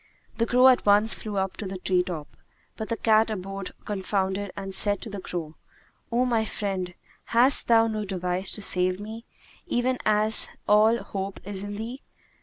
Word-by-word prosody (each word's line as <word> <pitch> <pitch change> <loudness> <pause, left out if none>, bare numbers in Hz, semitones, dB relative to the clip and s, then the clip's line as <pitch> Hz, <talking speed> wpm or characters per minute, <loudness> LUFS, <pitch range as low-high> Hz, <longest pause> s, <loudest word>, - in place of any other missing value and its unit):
The 230 - +2
crow 250 +2 +5
at 255 -1 +5
once 205 +2 +4
flew 210 -2 -6
up 190 0 -2
to 205 - -5
the 190 0 -5
tree 185 0 +1
top; 165 -5 -6 0.4
but 220 - -6
the 230 - -1
cat 220 0 +3
abode 195 -2 -5
confounded 195 -1 -2
and 195 -1 -5
said 205 0 +4
to 225 - -8
the 200 - -5
crow, 165 -4 -6 0.5
"O 245 +2 +2
my 230 -3 +1
friend, 190 -4 -4 0.3
hast 245 +4 +3
thou 225 -1 +5
no 215 -1 -2
device 185 -1 -1
to 210 - +2
save 180 0 +1
me, 220 +3 -8 0.4
even 250 +1 0
as 215 +1 +3 0.2
all 215 +2 +5
my 235 - -5
hope 195 0 -5
is 195 -1 -5
in 205 0 -5
thee?" 235 +6 -6
205 Hz, 185 wpm, -26 LUFS, 190-225 Hz, 0.5 s, crow